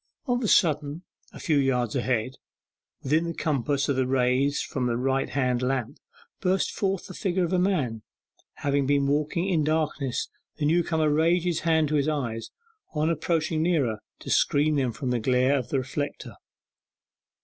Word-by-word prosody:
Of 245 -2 0
a - - +1
sudden, 150 -3 +2 0.3
a - - -11
few 155 -3 +1
yards 125 -4 0
ahead, 130 0 -1 0.7
within 155 +5 +2
the 170 - -3
compass 140 -2 0
of 140 - 0
the 130 -1 +1
rays 130 +2 +2
from 125 -2 -2
the 120 -1 0
right 135 +2 0
hand 125 -3 0
lamp, 125 -2 -2 0.4
burst 190 0 +1
forward 195 -2 -1
the 185 - -9
figure 185 0 -1
of 175 - -1
a 180 - +3
man. 150 - 0 0.6
Having 140 -1 +1
been 140 0 +2
walking 150 +5 0
in 170 -5 +2
darkness 150 -4 -1 0.3
the 150 - -1
newcomer 160 0 +2
raised 165 +3 +2
his 175 -3 0
hands 160 -2 +2
to 155 - 0
his 140 0 +1
eyes, 120 -7 -2 0.5
on 155 +2 +1
approaching 160 0 0
nearer, 145 -11 +1 0.2
to - - -6
screen 150 +2 +3
them 130 -4 +1
from 130 +1 -4
the 120 - +1
glare 130 +3 +2
of 125 -1 -6
the 140 - 0
reflector. 140 +3 -4
145 Hz, 170 wpm, -26 LUFS, 130-160 Hz, 0.7 s, a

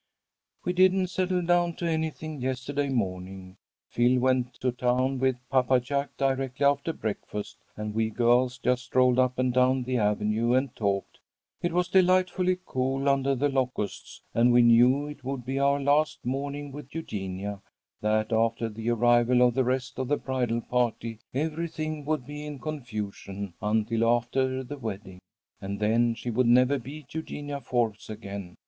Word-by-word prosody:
"We 180 - 0
didn't 185 0 +4
settle 185 -1 0
down 175 0 +2
to 175 - -4
anything 160 -2 -2
yesterday 130 +2 -2
morning. 95 -5 -3 0.3
Phil 125 +2 +3
went 125 -1 +1
to 125 +1 -1
town 125 +2 0
with 130 0 +2
Papa 130 -1 +3
Jack 140 +3 -3
directly 135 0 0
after 140 +3 +2
breakfast, 105 -5 -5 0.2
and 105 0 -4
we 110 0 +1
girls 125 +2 +2
just 125 -2 +1
strolled 125 -1 +3
up 130 0 +2
and 130 -1 +1
down 130 +1 +3
the 125 0 -1
avenue 105 +3 +1
and 130 -1 0
talked. 100 -2 -2 0.4
It 175 - 0
was 175 +1 +1
delightfully 185 0 +3
cool 135 +2 -1
under 140 0 +2
the 140 +3 +1
locusts, 130 -6 -3
and 120 +1 +4
we 120 0 +6
knew 125 +4 +5
it 145 -2 -9
would 130 -2 -4
be 135 +2 -2
our 140 +1 +3
last 145 +2 +1
morning 140 +2 -3
with 145 +1 -10
Eugenia; 100 - -5 0.4
that 110 +1 +1
after 115 0 +1
the 110 +2 -4
arrival 120 +1 +4
of 125 -1 +4
the 130 - +2
rest 130 +1 -2
of 130 - -1
the 145 +2 +1
bridal 125 -3 -1
party, 115 -2 -1
everything 155 +1 -3
would 150 -4 -1
be 150 +2 -7
in 150 -1 -6
confusion 105 - -6
until 110 +2 +1
after 130 +2 +1
the 145 +3 -8
wedding, 100 -5 -6 0.4
and 100 +1 -4
then 115 +2 +2
she 120 +1 -4
would 120 +2 +2
never 125 +3 +4
be 140 +5 -9
Eugenia 145 -3 -5
Forbes 115 -6 -1
again. 100 -4 -7
125 Hz, 160 wpm, -27 LUFS, 115-140 Hz, 0.4 s, we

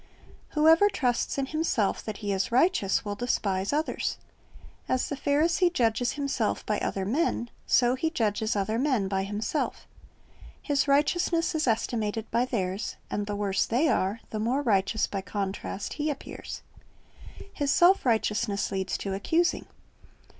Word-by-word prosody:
Whoever 325 +6 +6
trusts 250 -9 0
in 275 - 0
himself 290 -8 0
that 215 -2 -4
he 200 - 0
is 190 +2 -1
righteous, 245 - +2
will 205 - -2
despise 200 -4 -1
others. 305 +2 -1 0.7
As 255 - +1
the 285 - -2
Pharisee 320 +6 +2
judges 240 -4 +1
himself 275 -6 -1
by 210 - 0
other 190 -1 -2
men, 240 - 0 0.2
so 245 -1 +4
he 280 +5 0
judges 220 -6 0
other 215 +3 0
men 255 -8 +1
by 190 0 -1
himself 210 +9 -3 0.7
His 290 -1 0
righteousness 330 +5 +2
is 310 -3 0
estimated 225 -1 -1
by 240 +2 +2
theirs, 195 -5 -2 0.2
and 205 0 -2
the 205 - -2
worse 200 -1 0
they 270 +8 +2
are, 205 -2 0
the 215 - -3
more 250 +6 0
righteous 215 -2 +2
by 195 - -4
contrast 195 +1 -4
he 300 0 -2
appears. 285 - -6 0.9
His 285 -1 -1
self 360 +6 +5
righteousness 215 -4 0
leads 190 -1 -2
to 195 - -4
accusing. 330 - 0
235 Hz, 145 wpm, -27 LUFS, 205-290 Hz, 0.9 s, Whoever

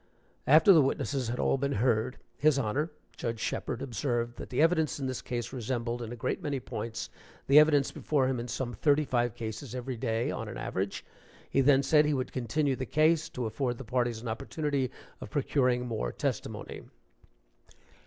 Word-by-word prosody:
After 160 +7 +8
the 160 - +7
witnesses 135 -1 -1
had 120 +2 -2
all 135 - +2
been 140 +1 0
heard, 115 +1 +1 0.2
his 150 -1 +3
Honor, 135 +6 0 0.3
Judge 115 -2 -3
Sheperd, 120 +3 -3
observed 120 -2 -2
that - - -7
the 125 - -2
evidence 160 -2 +3
in 135 - -3
this 130 -1 -3
case 120 0 -4
resembled, 120 -1 -2
in 115 -1 -5
a - - -5
great 115 - -2
many 145 -3 -2
points, 110 -3 -5 0.3
the 140 +2 +8
evidence 150 -3 +4
before 145 -4 0
him 130 -2 -1
in 120 - -4
some 120 0 -3
thirty 145 +7 +2
five 120 -4 0
cases 115 +3 -6
every 125 0 -4
day, 115 +2 -1
on 115 - -4
an 115 +3 -6
average. 95 -4 -3 0.4
He 135 - +2
then 135 0 +5
said 150 +1 +5
he 150 -1 +1
would 130 -1 -3
continue 135 +3 0
the 130 -1 -4
case, 160 +1 +3
to 125 - -4
afford 120 +2 -2
the 135 - -7
parties 120 -1 -1
an - - -5
opportunity 135 +4 -2 0.3
of - - -8
procuring 125 -4 +1
more 110 - -2
testimony. - - -4
130 Hz, 185 wpm, -30 LUFS, 120-145 Hz, 0.4 s, After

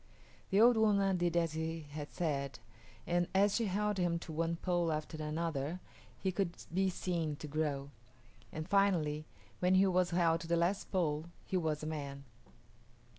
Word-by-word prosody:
The 195 - +3
old 235 +1 +7
woman 200 -3 +3
did 175 -1 +1
as 165 -2 +1
he 160 +1 -3
had 150 0 -6
said, 140 -6 -2 0.5
and 175 0 +1
as 200 +1 +4
she 230 - +1
held 205 +1 0
him 175 -1 +1
to 170 -1 -8
one 165 +2 0
pole 175 -1 0
after 155 +1 -3
another 155 +1 -2 0.4
he 190 - -1
could 185 -2 -1 0.2
be 190 +1 +2
seen 170 -4 -2
to 150 +1 -8
grow; 145 -2 -2 0.6
and 155 +1 -5
finally 170 -7 +2 0.3
when 180 +1 +3
he 190 +1 +6
was 185 -1 +2
held 170 -2 +2
to 165 - -7
the 170 0 +2
last 175 +4 0
pole 160 -5 0 0.2
he - - -3
was 155 -4 0
a - - -3
man. 140 -3 -5
170 Hz, 175 wpm, -34 LUFS, 155-185 Hz, 0.6 s, old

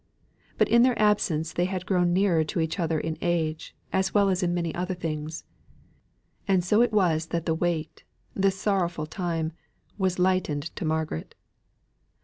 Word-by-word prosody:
But - - +4
in 235 - +5
their 250 0 +3
absence 180 -7 +2
they 175 - +1
had 185 -1 -3
grown 180 -2 +2
nearer 180 -3 +3
to 155 - -3
each 160 +3 -1
other 165 -2 0
in 160 0 -4
age, 160 -3 -1 0.2
as 190 +1 0
well 200 -1 +5
as 185 0 +1
in 175 -1 +1
many 170 -2 -1
other 180 +1 -2
things. 155 -2 -4 1.0
And 190 -3 +3
so 210 +5 +4
it 240 -1 +3
was 170 -6 +2
that 170 0 -2
the 160 - +1
weight, 165 -1 -2 0.3
this 195 0 +1
sorrowful 175 -6 0
time, 165 -1 -3 0.5
was 185 -2 +1
lightened 180 -5 0
to 185 - -4
Margaret. 155 - -2
175 Hz, 165 wpm, -26 LUFS, 160-190 Hz, 1.0 s, in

